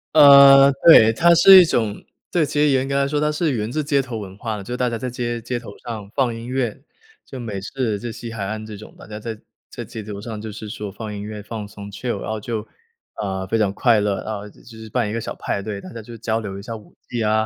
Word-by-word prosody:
呃， 140 -2 +9
对， 115 -9 +9
它 170 +8 +5
是 190 +2 +9
一 - - +4
种 110 -9 -1 0.3
对， 170 -3 +2
其 150 - -8
实 150 0 +4
严 135 -1 +1
格 140 - -2
来 140 0 +2
说 145 +1 -1
它 150 0 +1
是 155 +1 0
源 110 -3 -3
自 155 +3 -1
街 140 -1 +1
头 125 -3 -6
文 100 -2 -8
化 110 -1 -4
的。 100 - -8
就 120 +5 -5
大 125 -1 0
家 115 - -3
在 125 +3 -4
街 120 -1 -4
街 120 +2 -3
头 110 -4 -11
上 110 -4 -7
放 130 -4 +1
音 115 +1 -8
乐， 125 -2 -2 0.4
就 130 - -9
美 110 -5 -5
式、 110 -2 -3
就 120 +1 -5
西 115 +1 -8
海 110 -3 -4
岸 110 +2 -5
这 110 -1 -9
种， 110 - -13
大 - - -13
家 105 0 -8
在 110 0 -6 0.3
在 - - -7
街 110 - -8
头 100 -1 -7
上 110 -1 -7
就 110 0 -6
是 105 +1 -8
说 105 -1 -6
放 105 +1 -7
音 100 - -6
乐、 105 0 -7
放 105 -1 -6
松、 100 0 -10
chill。 105 +1 -4
然 - - -6
后 110 - -3
就， 110 0 -4 0.5
啊， 95 -1 -3
非 115 - 0
常 105 -3 +1
快 115 -2 +3
乐。 100 -1 -1
然 110 - -4
后 105 0 -7
就 - - -20 0.2
是 110 0 -10
办 115 -1 -1
一 - - -4
个 115 - -2
小 - - -6
派 100 - -3
对， 100 -1 -6
大 - - -10
家 115 - -8
就 115 +2 -11
交 110 0 -1
流 100 -3 -6
一 100 - -8
下 115 +1 -6
舞 110 - -14
技 120 -2 -3
啊， 110 0 +2
115 Hz, 310 characters per minute, -21 LUFS, 105-125 Hz, 0.5 s, 呃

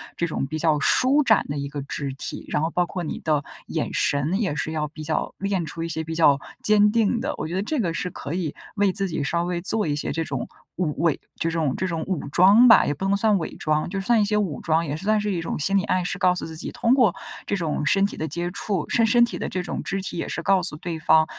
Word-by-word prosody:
这 170 - -1
种 150 - -2
比 155 +3 -4
较 155 -2 +2
舒 275 - +3
展 220 -4 +3
的 145 0 -3
一 140 0 -3
个 140 0 -5
肢 140 0 -4
体。 - - -6
然 150 - 0
后 160 - 0
包 175 +1 +1
括 180 0 -5
你 155 - -4
的 150 -3 +1 0.2
眼 - - -2
神， 145 +8 +1
也 190 -9 0
是 155 - -2
要 155 -1 -2
比 155 +1 -10
较 155 0 -2
练 195 -4 -1
出 165 +2 -7
一 165 - -3
些 160 0 -2
比 160 +1 -5
较 145 -4 +5 0.2
坚 210 -1 +5
定 230 +1 +2
的。 275 +5 -2
我 155 - -3
觉 175 - -4
得 195 - 0
这 300 +4 -2
个 175 -6 0
是 180 - -2
可 145 0 -6
以 165 -5 -2 0.2
为 200 -2 +3
自 195 -1 +1
己 160 - -2
稍 170 +4 0
微 175 -1 -2
做 205 0 0
一 145 - 0
些 150 - -3
这 165 - -1
种 135 -5 -4 0.3
武 160 -4 -1
伪， 165 -4 +2 0.2
这 165 - -1
种 155 -5 0
这 185 - -1
种 165 -2 -2
武 180 -7 -2
装 200 - +6
吧， - - +7
也 145 - 0
不 190 +7 -5
能 200 +1 +2
算 210 -1 +3
伪 165 - -5
装， 155 +1 0
就 195 +1 -3
算 220 +3 +3
一 - - +4
些 210 +1 +1
武 190 -8 -1
装。 165 +1 +1
也 145 0 -3
是 160 - -7
算 215 +1 +2
是 210 -1 -1
一 170 - -2
种 165 - -4
心 195 +6 +2
理 190 - +1
暗 185 -3 0
示， - - -2
告 180 -1 +3
诉 - - -4
自 160 0 -8
己 155 - -6
通 235 +2 +2
过 240 -9 +4 0.3
这 200 - -1
种 155 -3 -2
身 195 +7 +3
体 - - -4
的 155 - -2
接 175 0 -2
触， 195 -4 -3
身 230 -2 +3
身 240 +2 +5
体 - - -5
的 - - -3
这 185 -1 -3
种 - - -4
肢 195 +1 -2
体 180 - -4
也 - - -3
是 165 - -3
告 195 -1 +3
诉 175 -3 -2
对 160 +1 -5
方， 160 0 +4
170 Hz, 305 characters per minute, -24 LUFS, 155-200 Hz, 0.3 s, 吧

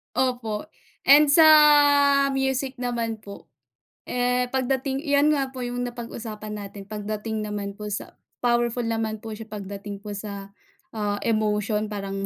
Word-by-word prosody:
Opo, 245 0 -1 0.3
and 290 +2 +7
sa 295 +3 +6 0.9
music 265 0 -1
naman 235 -3 -2
po, 200 -1 -12 0.6
eh, 250 0 0
pagdating 265 +2 -1
'yan 285 +1 +3
nga 275 -3 0
po 255 - -6
'yang 245 0 -3
napag-usapan 225 -3 -7
natin, 200 0 -9
pagdating 215 +1 -4
naman 205 -1 -5
po 210 - -7
sa - - -6 0.2
powerful 240 0 +1
naman 225 -2 -2
po 225 - -8
siya 225 - -8
pagdating 200 -1 -7
po 210 - -9
sa, 200 -1 -7 0.4
ah, 205 -2 -3
emotion. 215 -1 0
Parang 195 -1 -4
225 Hz, 135 wpm, -24 LUFS, 210-250 Hz, 0.9 s, and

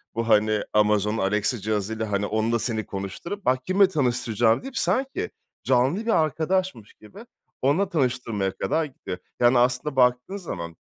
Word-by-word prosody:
bu, 115 0 -2
hani, 110 -1 +3
Amazon'un 105 0 +2
Alexa 105 +5 0
cihazıyla, 110 +1 -2
hani, 100 0 0
onunla 110 +2 0
seni 110 -2 -2
konuşturup 100 - -6
bak 130 0 +1
kiminle 195 +1 +4
tanıştıracağım 120 - +1
deyip, 265 0 -7
sanki 275 +11 -1 0.3
canlı 135 - +2
bir 230 - +1
arkadaşmış 160 - -2
gibi 195 - -14 0.4
onunla 160 +9 +2
tanıştırmaya 125 - -1
kadar 160 +12 0
gidiyor. 130 -10 -7 0.2
Yani 120 +1 +5
aslında 125 +4 +1
baktığın 125 +8 +2
zaman 85 - -6
120 Hz, 145 wpm, -24 LUFS, 105-160 Hz, 0.4 s, Yani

